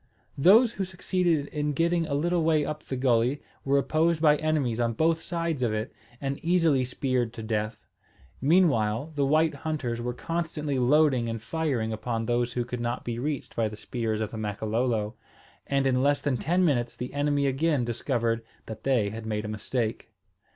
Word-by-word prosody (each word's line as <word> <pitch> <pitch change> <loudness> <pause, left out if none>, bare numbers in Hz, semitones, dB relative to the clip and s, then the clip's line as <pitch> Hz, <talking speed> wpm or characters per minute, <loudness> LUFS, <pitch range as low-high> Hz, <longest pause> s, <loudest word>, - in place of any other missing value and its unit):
Those 215 - +6
who 195 - -2
succeeded 180 -4 0
in 150 0 -2
getting 170 +2 +1
a 140 - -1
little 170 +3 +1
way 155 -2 +3
up 150 +1 -4
the 135 - -5
gulley 125 +1 +2 0.2
were 140 +1 +2
opposed 155 +3 +2
by 150 -2 +5
enemies 145 -7 0
on 115 -1 +1
both 160 +5 +1
sides 165 -4 -2
of 120 -3 +1
it, 110 0 -4 0.3
and 140 0 -4
easily 165 -6 +3
speared 125 -2 -1
to 115 - -7
death. 110 -1 -3 0.6
Meanwhile 140 - +2
the 140 -2 +1
white 155 +3 +3
hunters 140 -5 -3
were 120 0 -3
constantly 155 -4 -2
loading 130 -2 +3
and 115 0 -3
firing 120 -3 -1
upon 115 +1 -3
those 120 +1 0
who 120 -1 -1
could 125 -1 -5
not 120 +1 -3
be 120 -1 -3
reached 145 +1 -3
by 115 -1 +1
the 105 - -7
spears 110 0 -3
of 110 - -2
the 110 - -6
Makololo; 110 +1 -1 0.5
and 140 -1 +1
in 130 -1 +2
less 145 +1 +3
than 140 -3 0
ten 175 +9 +1
minutes 120 -6 0
the 125 - -6
enemy 145 0 +1
again 140 -1 +1
discovered 115 -1 -1 0.2
that 110 -1 -8
they 120 -7 +1
had 110 0 -7
made 105 -1 -2
a - - -3
mistake. 110 +2 -3
130 Hz, 185 wpm, -27 LUFS, 115-155 Hz, 0.6 s, Those